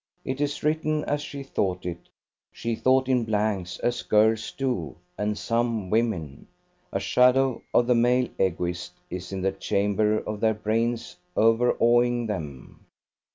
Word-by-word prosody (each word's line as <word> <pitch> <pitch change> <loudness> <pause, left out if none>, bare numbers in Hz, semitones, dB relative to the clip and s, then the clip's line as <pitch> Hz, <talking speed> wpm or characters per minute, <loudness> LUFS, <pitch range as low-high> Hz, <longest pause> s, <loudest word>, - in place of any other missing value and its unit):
It 130 +2 -3
is 145 0 -2
written 155 0 0
as 145 0 -1
she 140 -1 -7
thought 95 -9 -2
it; 85 -1 -6 0.4
she 115 0 -3
thought 130 +3 +2
in 125 -2 +2
blanks, 105 -5 -1
as 120 - 0
girls 110 +1 +2
do, 125 - -2 0.2
and 105 0 -2
some 115 -5 -1
women. 100 - -1 0.4
A - - -1
shadow 125 0 +3
of 120 - +4
the 125 - +3
male 125 +1 +3
Egoist 90 -1 -1 0.2
is 90 +1 -6
in 95 -1 -4
the 95 - +2
chamber 105 +2 +1
of 105 -1 -4
their 110 0 +2
brains 115 +6 -1 0.2
overawing 120 +1 +3
them. 80 - -7
115 Hz, 145 wpm, -26 LUFS, 100-125 Hz, 0.4 s, of